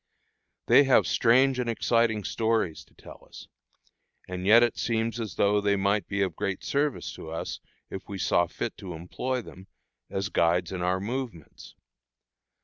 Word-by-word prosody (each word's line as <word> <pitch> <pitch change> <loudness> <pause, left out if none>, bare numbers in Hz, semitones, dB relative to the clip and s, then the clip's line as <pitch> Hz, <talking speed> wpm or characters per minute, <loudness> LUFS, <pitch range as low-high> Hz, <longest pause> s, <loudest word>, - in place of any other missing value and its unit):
They 145 - +6
have 135 - +4
strange 130 +3 +3
and 120 -1 -1
exciting 115 -2 +1
stories 110 -8 -1
to - - -29
tell - - -14
us, - - -13 0.8
and 90 +1 -5
yet 115 +3 +7
it 120 - 0
seems 115 0 -1
as 110 -3 -5
though 100 0 +2
they 100 0 +2
might 100 +1 0
be 100 -1 0
of 90 -4 -3
great 95 +2 -3
service 145 0 -1
to 80 - -9
us, 80 - -5 0.3
if 95 - -8
we 100 - -5
saw 85 -2 +2
fit - - -5
to 90 -3 -7
employ 125 +10 -3
them, 95 -1 -13 0.4
as 95 +1 -3
guides 85 -1 +1
in 95 -2 -4
our 90 +1 0
movements. 110 - -6
100 Hz, 165 wpm, -27 LUFS, 90-115 Hz, 0.8 s, yet